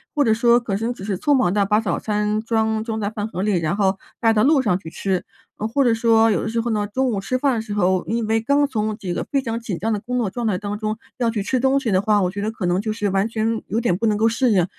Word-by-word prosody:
或 290 - +3
者 225 - +3
说 235 +2 +4
可能 225 +2 -2
只 195 - -11
是 200 -3 -2
匆 290 - +2
忙 195 -10 +2
地 200 -1 +2
把 210 +2 +2
早 215 - -1
餐 210 0 -1
装 220 -1 0
装 220 -2 -3
在 205 - -1
饭 215 -1 -4
盒 185 -4 -5
里， 200 -2 +1
然 165 +3 -1
后 195 -1 +1 0.2
带 225 -1 +4
到 215 -1 +3
路 285 0 +4
上 200 -7 +1
去 160 - -9
吃。 190 +1 -2 0.3
呃， 215 - -2
或 275 +5 +1
者 235 -3 +3
说 225 -1 +4
有 - - +1
的 - - -3
时 230 +1 -1
候 235 0 -2
呢， 210 -1 0
中 260 +4 0
午 205 - -1
吃 255 +6 -1
饭 275 0 +1
的 225 - -1
时 215 -2 -6
候， 185 -2 +1
因 230 0 -1
为 220 +1 +1
刚 280 +5 +2
从 215 -5 -2
这个 180 -4 -4
非 275 -2 +1
常 230 -3 -3
紧 215 -7 -4
张 220 +7 -2
的 210 - 0
工 250 +4 -4
作 225 -5 0
状 240 +2 -3
态 195 -4 +1
当 205 +1 -5
中 215 0 -2 0.2
要 240 -2 +1
去 210 -3 -2
吃 255 +4 0
东 270 +2 +2
西 230 - -1
的 185 0 +3
话， 210 -1 +2
我 180 0 0
觉 200 - -5
得 210 - -1
可 220 -4 -5
能 175 +2 +1
就 215 +1 -2
是 210 -2 -1
完 195 +2 +1
全 225 0 -1
有 225 +4 -1
点 180 -7 +1
不 230 - -1
能 210 -1 +2
够 225 +1 +3
适 240 +1 +1
应， 180 -4 +3
220 Hz, 335 characters per minute, -21 LUFS, 200-230 Hz, 0.3 s, 说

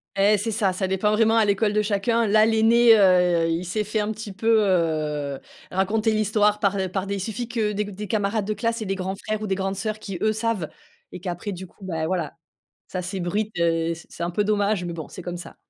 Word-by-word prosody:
Et 205 +2 +4
c'est 225 +3 -2
ça, 200 -3 +1
ça 190 0 -1
dépend 190 +2 +1
vraiment 225 +1 +3
à 220 - +5
l'école 205 +1 +1
de 215 - +3
chacun. 215 +3 +1
Là, 215 +1 +5
l'aîné, 225 +1 +5
heu, 180 -4 +4
il 165 +2 -1
s'est 210 +5 -1
fait 215 +2 -2
un 210 +1 -1
petit 220 -1 -7
peu, 225 +3 +2
heu, 155 -6 0 0.3
raconter 215 +4 +1
l'histoire 210 -1 +2
par 200 -1 +1
par 190 0 -2
des 200 - -2
il - - -4
suffit 225 +4 -4
que 225 -3 -1
des 210 0 -1
c 205 - -8
des 210 +2 -6
camarades 205 0 0
de 215 - -1
classe 230 0 -2
et - - -6
des 195 - -1
grands 190 0 -3
frères 215 +1 -4
ou 215 - -3
des 190 - 0
grandes 195 0 -2
sœurs 215 +2 -3
qui, 195 -4 -7
eux, 215 - +3
savent 220 -6 -2 0.4
et - - -8
qu'après 180 +3 -4
du 190 0 -7
coup, 190 +3 -18
bah, 165 -4 -2
voilà. 170 -2 -2 0.5
Ça 185 - -4
s'ébruite, 190 +3 -2
heu, 165 0 +1
c 160 - -14
c'est - - -8
un 170 - -1
peu 205 +4 0
dommage 205 -2 +1
mais 170 - -4
bon, 160 -3 -7
c'est - - -10
comme 175 0 -5
ça. 175 - -10
200 Hz, 245 wpm, -24 LUFS, 180-215 Hz, 0.5 s, à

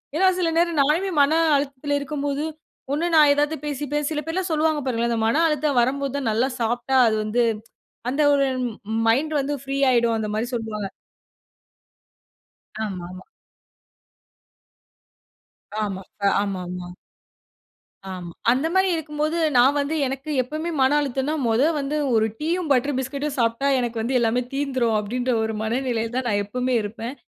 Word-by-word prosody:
ஏன்னா 375 +4 +4
சில 335 -2 +1
நேரம் 340 -2 +2
நானுமே 330 +7 +2
மன 310 +3 +4 0.2
அழுத்தத்தில 285 +1 -2
இருக்கும்போது, 285 0 -3 0.5
ஒண்ணு 310 +4 0
நான் 300 -2 +7
ஏதாவது 295 +2 +1
பேசி 290 0 -3
பேசி 295 0 0
சில 300 - -1
பேர்லாம் 355 +2 -2
சொல்லுவாங்க 310 -1 +1
பாருங்களேன், 235 -2 0
அந்த 225 -1 0
மன 285 +8 +2
அழுத்தம் 300 -3 +1
வரம்போது 275 +2 -1
தான் 265 -5 -1
நல்லா 235 +5 +1
சாப்பிட்டா 240 +3 0
அது 220 - +2
வந்து 225 +3 +1 0.7
அந்த 280 +4 0
ஒரு 275 -1 +3 0.2
ம் 235 -3 -4 0.3
மைண்ட் 285 +7 +2
வந்து 280 +1 -1
ஃப்ரீ 275 0 -3
ஆயிடும் 235 -2 +3
அந்த 220 -1 -2
மாரி 225 +2 0
சொல்லுவாங்க. 215 -3 -4 2.0
ஆமாமா. 185 -1 -7 2.6
ஆமா, 195 -2 -3 0.2
அ - - +6
ஆமாமா. 180 -3 -4 1.2
ஆமா. 175 -2 -7 0.2
அந்த 265 +6 +1
மாரி 380 0 +3
இருக்கும்போது 305 +1 -2 0.2
நான் 265 +4 +5
வந்து 285 +3 -1
எனக்கு 270 +3 -5
எப்பவுமே 310 +6 -4
மன 260 +1 +4
அழுத்தம்னா, 275 +2 -1
"மொத 225 +3 +2 0.2
வந்து 285 +2 -2 0.2
1 220 0 +4
டீயும், 330 +2 -1
பட்டர் 275 +1 +2
பிஸ்கட்டும் 280 +2 -3
சாப்பிட்டா 230 +3 +1
எனக்கு 240 -2 -2
வந்து 250 +3 +1
எல்லாமே 235 +1 +1
தீர்ந்துரும்." 260 -5 0
அப்படீன்ற 245 +4 -2
ஒரு 220 0 -2
மனநிலையில 230 0 -1
தான் 255 -1 -1
நான் 205 -1 +1
எப்பவுமே 250 +5 -2
இருப்பேன். 225 +5 -6
265 Hz, 145 wpm, -23 LUFS, 230-295 Hz, 2.6 s, நான்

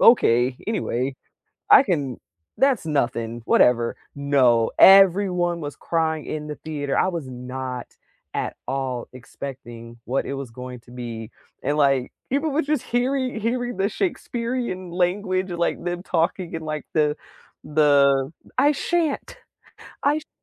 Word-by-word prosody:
"Okay. 125 - +5
Anyway, 135 - -1 0.5
I - - +9
can 145 - -2 0.4
that's 265 -5 +3
nothing, 120 -6 -1
whatever." 120 -1 +3 0.2
No, 130 -5 +3
everyone 185 -3 +6
was 145 -1 -5
crying 160 -2 -1
in 150 -1 -4
the 150 - -5
theater. 145 -3 -3
I - - +3
was 170 -7 -4
not, 125 0 -6 0.5
at - - -3
all, 130 -3 -2
expecting 120 -3 -9
what 130 +3 -1
it 140 - -3
was 135 -3 -6
going 125 +1 -8
to 120 - -20
be. 115 -2 -6 0.3
And 145 +3 0
like, 135 -3 +2 0.2
people 285 +4 +1
were 295 +3 +1
just 300 - 0
heari 255 0 0
hearing 245 0 -2
the 195 +1 +2
Shakespearean 235 - -3
language, 185 +1 0
like, 170 -1 -1
them 175 0 -3
talking 170 0 -1
in 160 - -4
like 155 -1 -4
the 150 -1 +2 0.5
the 140 -3 +4 0.3
"I 285 +3 +5 0.2
shan't, 335 -5 0 0.7
I 285 - +4
sh - - -10
t" - - -59
150 Hz, 140 wpm, -23 LUFS, 130-195 Hz, 0.7 s, I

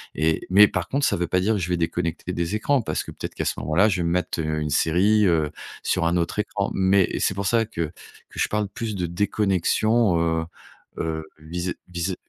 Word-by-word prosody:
et 80 0 +1
mais 100 +2 +8
par 90 -2 -3
contre 140 +1 0
ça - - +2
veut 90 - -1
pas 90 +2 +1
dire 105 +4 +2
que - - -1
je 90 0 -3
vais 90 - +1
déconnecter 85 +1 -2
des 85 +4 -1
écrans 135 +4 +2
parce 80 -6 -2
que - - -9
peut-être - - -7
qu'à - - -2
ce - - -1
moment-là 80 +9 +3
je 95 - 0
vais 85 - 0
me - - 0
mettre, 90 -1 -1
heu, 80 0 -1
une 75 - -2
série, 100 +8 +3
heu, 80 -4 +2 0.3
sur 85 -2 0
un 85 +1 +1
autre 85 +4 -1
écran, 100 -1 -1
mais 95 -1 +2
c'est 95 - +1
pour 100 0 -3
ça 115 +3 +2
que 105 -6 -5 0.5
que - - -10
je - - +2
parle 105 -1 -1
plus 110 -1 -4
de 90 -2 -1
déconnexion, 105 +2 +1
heu 80 -1 0 0.5
heu, 80 -1 -3
vis-à 85 +3 -4 0.2
vis-à 90 +1 -2
90 Hz, 230 wpm, -24 LUFS, 85-105 Hz, 0.5 s, mais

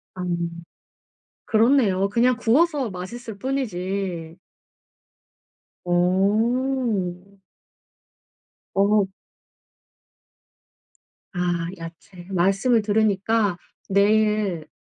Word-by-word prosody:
아 185 - -6 1.2
그렇네요. 220 -5 +3
그냥 240 +3 +2
구워서 270 +1 +2
맛있을 200 +4 -7
뿐이지. 190 -9 -3 1.5
음. 200 +2 0 1.4
어. 200 0 +3 2.3
아 175 -1 -1
야채. 165 +2 -11
말씀을 195 +6 +2
들으니까 210 -2 +1 0.3
내일 205 -4 +2
200 Hz, 120 characters per minute, -23 LUFS, 180-230 Hz, 2.3 s, 그렇네요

